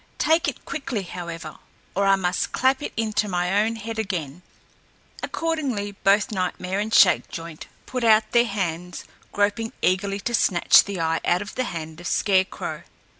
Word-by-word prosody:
Take 325 +2 +2
it - - -5
quickly, 270 -8 -3
however, 170 -3 -7 0.3
or 200 +1 +1
I 195 - +6
must 180 -2 -1
clap 265 +1 +2
it - - -4
into 215 -1 0
my 180 +2 +1
own 225 +1 0
head 225 0 -6
again!" 175 -7 -3 0.8
Accordingly, 275 -11 -2
both 200 +2 +2
Nightmare 185 0 -2
and 215 +2 -2
Shakejoint 165 -6 +2 0.2
put 255 -1 -4
out 220 -1 +4
their 235 0 +4
hands, 180 -4 -3 0.3
groping 205 +2 0
eagerly 195 +2 +1
to 240 - -3
snatch 185 -6 +5
the 200 -3 -5
eye 165 0 0
out 180 +3 +1
of 205 - -10
the 255 - -1
hand 160 -4 -6
of 175 - -6
Scarecrow. 190 -2 0
200 Hz, 160 wpm, -24 LUFS, 180-225 Hz, 0.8 s, I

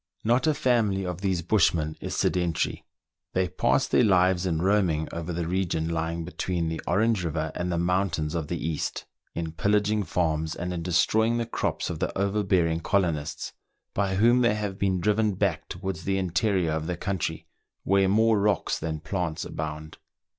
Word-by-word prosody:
Not 120 +5 +2
a 155 - +3
family 115 -9 +1
of 90 0 -4
these 95 -4 0
bushmen 85 -5 +2
is - - -4
sedentary; 90 -3 0 0.5
they 95 0 +1
pass - - +1
their - - +3
lives 95 -3 +3
in 80 -3 0
roaming 90 -5 +2
over 85 +1 -4
the 85 -1 -2
re 95 +2 +1
gion 80 -2 -2
lying 80 0 -2
between 85 -1 -2
the 80 - -4
Orange 105 +3 +2
River 80 -1 -2
and 90 +1 -2
the 85 - 0
mountains 85 -3 0
of 80 -3 -2
the 85 - -2
East, 80 -1 -3 0.3
in 80 -1 -3
pillaging 105 +4 +1
farms, 80 -3 -1
and 90 +1 -4
in 85 - -3
destroying 110 +7 +2
the 120 - -1
crops - - -2
of - - -5
the - - -2
overbearing 95 -5 +1
colonists, 80 -5 -1 0.4
by 95 -1 0
whom 120 +5 +4
they 120 -3 +3
have 105 -2 -4
been 95 -2 +1
driven 105 0 +2
back - - -1
towards 95 -1 -5
the 95 0 0
interior 95 -1 +1
of 80 0 -2
the 90 -2 -2
country, 95 -2 -3 0.4
where 95 0 +3
more 110 +1 +4
rocks 100 -2 +1
than 80 -1 -4
plants 85 -1 -3
abound. 75 0 -6
90 Hz, 175 wpm, -26 LUFS, 80-100 Hz, 0.5 s, whom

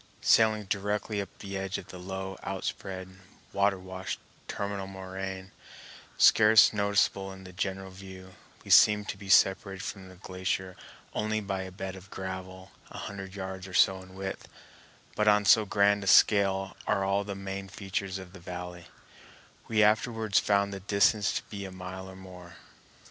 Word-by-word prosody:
Sailing 110 -1 +4
directly 105 +1 -2
up 100 - -7
to - - -11
the 100 0 -5
edge 95 0 -3
of - - -10
the 90 - -9
low, 95 +1 -5
outspread, 95 -1 -5 0.4
water 100 0 +2
washed 95 0 -6 0.3
terminal 100 -1 -4
moraine, 95 0 -6 0.7
scarce 110 -1 +7
noticeable 100 -1 +1
in 95 0 -11
a 90 - -10
general 95 0 -4
view, 95 0 -11 0.3
we - - -5
seemed 105 -1 +6
to - - -2
be 100 -1 -10
separated 95 -1 +3
from 95 -2 -7
the 95 - -13
glacier 95 0 -3 0.4
only 110 0 -1
by 100 -2 -3
a 95 0 -7
bed 95 0 -6
of 95 +1 -13
gravel 95 0 -7 0.2
a - - -10
hundred 95 -1 -7
yards 95 -1 -6
or 90 - -8
so 95 +1 +4
in 95 0 -14
width; 95 0 -6 0.7
but 105 - +1
on 105 0 +5
so 110 +1 +6
grand 100 0 +3
a - - -6
scale 95 -1 +4
are 100 -2 +1
all 100 +1 +1
the 100 -1 -5
main 95 0 -6
features 95 -1 -4
of 95 -1 -10
the 100 - -11
valley, 90 0 -8 0.8
we 110 -1 +3
afterwards 110 0 +2
found 100 -1 +1
the 100 - -5
distance 100 +2 +2
to - - -3
be 100 -2 -7
a 95 - -7
mile 95 +1 -8
or 95 - -11
more. 90 -2 -12
95 Hz, 170 wpm, -29 LUFS, 95-100 Hz, 0.8 s, scarce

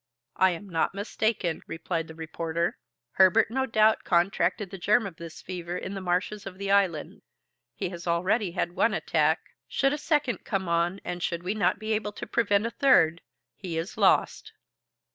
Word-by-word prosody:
"I 190 - +4
am 180 +3 -5
not 170 +1 -1
mistaken," 200 -4 -1
replied 165 0 -3
the 160 - -11
reporter. 165 +1 -3 0.3
"Herbert 200 +6 +4
no 265 +2 0
doubt 220 -1 +3
contracted 180 +2 +1
the 195 - -7
germ 210 +5 +3
of 180 -4 -7
this 165 -1 -10
fever 175 -1 -5
in 190 - -5
the 195 - -5
marshes 185 +3 -1
of 185 -1 -9
the 200 0 -2
island. 190 -6 +1 0.5
He - - -3
has 175 -1 -8
already 180 +3 +1
had 175 -1 -1
one 175 - +1
attack; - - +1 0.3
should 275 +1 +1
a 295 - -3
second 295 -6 0
come 190 -3 -2
on 170 +3 0
and 175 0 -4
should 170 -1 -2
we 185 +3 -1
not 215 - +1
be 220 0 -2
able 210 -1 -2
to - - -7
prevent 205 -3 +1
a 230 - -2
third, 170 - +4 0.3
he 175 0 -5
is 165 +4 -4
lost." 200 -3 +2
190 Hz, 180 wpm, -27 LUFS, 170-210 Hz, 0.5 s, I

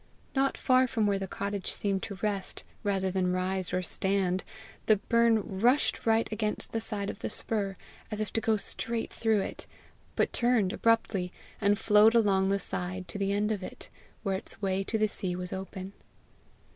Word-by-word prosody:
Not 270 0 +2
far 255 0 +4
from 230 -4 0
where 200 -1 +2
the 195 - -3
cottage 200 0 -3
seemed 195 -2 -1
to 200 - -5
rest 200 -3 -2 0.2
rather 195 -2 0
than 180 -1 +1
rise 185 0 0
or 180 0 0
stand, 190 0 0 0.4
the 215 - +7
burn 220 -2 +2
rushed 245 +2 +2
right 225 0 +4
against 215 -1 -2
the 225 - -1
side 205 -2 -2
of - - -13
the - - -3
spur, 200 -4 -2 0.3
as 215 - -4
if 215 -2 -3
to 225 - +1
go 220 -1 +2
straight 230 +2 -3
through 220 -3 +2
it, - - -6 0.5
but - - +1
turned 235 -6 +2
abruptly, 220 -5 +1 0.3
and 205 0 +3
flowed 215 +1 +5
along 195 -4 +4
the 200 - +3
side 185 -1 -4
to 205 - -5
the 195 0 +1
end 205 +2 +1
of 205 -3 -1
it, - - -8 0.3
where 195 -3 0
its 195 - -9
way 195 -1 0
to 220 - 0
the 215 0 +3
sea 185 -3 -1
was 180 0 -5
open. 190 0 -6
200 Hz, 185 wpm, -29 LUFS, 190-220 Hz, 0.5 s, the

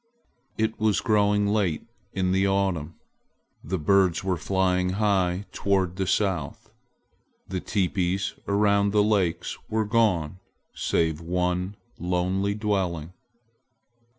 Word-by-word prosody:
It 110 0 -1
was 110 -2 +2
growing 105 -1 +2
late 100 -6 0 0.3
in 95 -1 0
the 95 +1 +2
autumn. 95 -5 0 0.7
The 95 +5 -2
birds 95 +2 +2
were 95 -1 0
flying 90 +1 0
high 95 -3 +1
toward 95 -3 0
the 95 -1 -1
south. 95 -4 -1 0.8
The 95 0 -3
teepees 95 -1 -1
around 100 0 +2
the 105 -1 +4
lakes 100 -6 0
were 110 0 0
gone, 100 -7 +1 0.3
save 80 -1 0
one 90 +3 -1 0.2
lonely 90 +3 0
dwelling. 95 -6 -2
95 Hz, 110 wpm, -25 LUFS, 90-100 Hz, 0.8 s, the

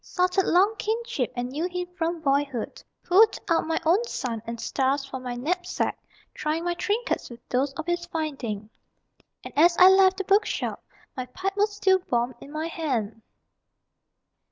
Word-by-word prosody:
Salted 365 +1 +1
long 390 +5 +4
kinship 445 - -2
and 245 0 -3
knew 305 +7 -2
him 360 0 -3
from 335 -1 -2
boy 280 -1 +3
hood 260 -6 -6 0.2
Pulled 420 +5 +5
out 335 -3 +2
my 325 - 0
own 360 +8 +4
sun 235 - -4
and 230 0 -5
stars 270 +3 0
from 265 -1 -7
my 250 -1 -4
knapsack, 355 +8 -1 0.4
Trying 310 +2 -2
my 350 - +1
trinkets 420 +7 -1
with 240 -1 -13
those 265 +3 +1
of 315 +3 -5
his 345 0 -2
finding 265 -11 -4 0.7
And - - -9
as 340 +3 +5
I 370 0 +9
left 380 0 +5
the 390 - -2
bookshop 400 +3 0 0.3
_My 255 -1 -6
pipe 385 +6 -3
was 415 0 +1
still 380 -2 +3
warm 240 +1 +1
in 280 - -11
my 310 +1 -3
hand. 255 - -3
325 Hz, 170 wpm, -26 LUFS, 260-375 Hz, 0.7 s, I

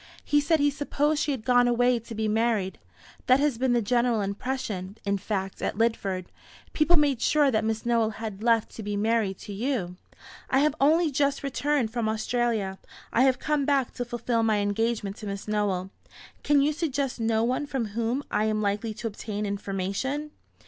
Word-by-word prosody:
He 295 0 +3
said 320 +2 +2
he 290 0 +3
supposed 295 +1 0
she - - 0
had 260 -6 -2
gone 245 -1 +4
away 245 0 +3
to 230 0 -9
be 220 0 -1
married. 215 -3 0 0.5
That 255 +1 +6
has 285 -5 +1
been 260 -1 +2
the 240 -2 +2
general 240 0 +2
impression, 200 -2 -4
in 200 0 0
fact, 195 -1 -3
at - - -2
Lidford. 200 -5 0 0.5
People 320 +3 +4
made 285 -5 +2
sure 290 0 +3
that 220 -2 +1
Miss 220 +1 -2
Nowell 230 -2 +2
had 215 -3 -6
left 230 -1 +2
to - - -8
be 205 -1 -3
married 215 -2 +1
to 205 - -7
you." 200 -5 -2 0.5
"I 265 - +3
have 300 -1 +3
only 315 +3 +4
just 280 0 0
returned 275 -4 0
from 235 -3 0
Australia. 220 -3 -1 0.3
I 235 - +3
have 260 -1 +3
come 300 +2 0
back 275 -3 +1
to 245 - -3
fulfil 240 -1 -1
my 220 -2 +2
engagement 205 0 -1
to 215 - -7
Miss 200 +1 -5
Nowell. 200 -3 -1 0.5
Can 290 -1 +4
you 300 +2 +2
suggest 285 -5 -2
no 225 0 +1
one 255 +5 0
from 250 -6 -2
whom 235 +5 -1
I 215 - +1
am 215 0 0
likely 210 +2 -1
to 230 - -8
obtain 210 -1 -4
information?" 200 +9 -3
230 Hz, 190 wpm, -27 LUFS, 210-270 Hz, 0.5 s, That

